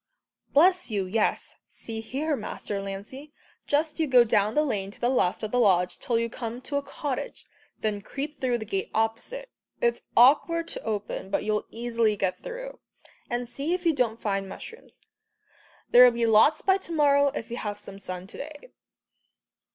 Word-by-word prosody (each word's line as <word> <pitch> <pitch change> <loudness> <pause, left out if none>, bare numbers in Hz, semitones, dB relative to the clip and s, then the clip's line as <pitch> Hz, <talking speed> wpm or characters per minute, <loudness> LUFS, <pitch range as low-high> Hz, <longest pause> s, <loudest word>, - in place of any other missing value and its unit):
"Bless 360 +3 +4
you, 200 -3 -1
yes. 210 +4 0
See 225 -1 -7
here, 285 +7 -2
Master 210 -3 -5
Lancey, 205 +10 -8 0.4
just 300 +2 0
you 320 - +2
go 250 -3 +7
down 215 -1 +1
the 300 - +4
lane 205 -9 -2
to 200 - -13
the 240 - +1
left 185 -6 +1
of 215 - -3
the 250 - +2
lodge 180 -5 +3
till 235 - 0
you 230 0 0
come 235 0 -6
to 285 +2 -3
a - - 0
cottage, 280 -1 -5 0.4
then 210 -2 -1
creep 285 +7 -6
through 250 -2 +1
the 220 - -6
gate 195 -1 -2
opposite 225 - -2 0.3
it's 475 -1 +1 0.2
awkward 300 +7 +5
to - - -6
open, 210 -3 -4
but 195 - 0
you'll 210 0 -1
easily 230 -2 0
get 190 -2 -1
through - - -7 0.5
and 240 0 -2
see 280 +8 -2
if 360 -1 -7
you 330 - +4
don't 235 -5 0
find 195 -2 -1
mushrooms. 455 - -11 0.9
There'll 250 +1 +9
be 235 -1 0
lots 225 +6 +5
by 380 0 +4
to 345 - -9
morrow 285 -3 +4
if 230 - -5
we've 210 -3 -4
some 195 -1 -10
sun 185 -1 -6
to 200 - -11
day." 305 - -9
240 Hz, 180 wpm, -27 LUFS, 210-295 Hz, 0.9 s, There'll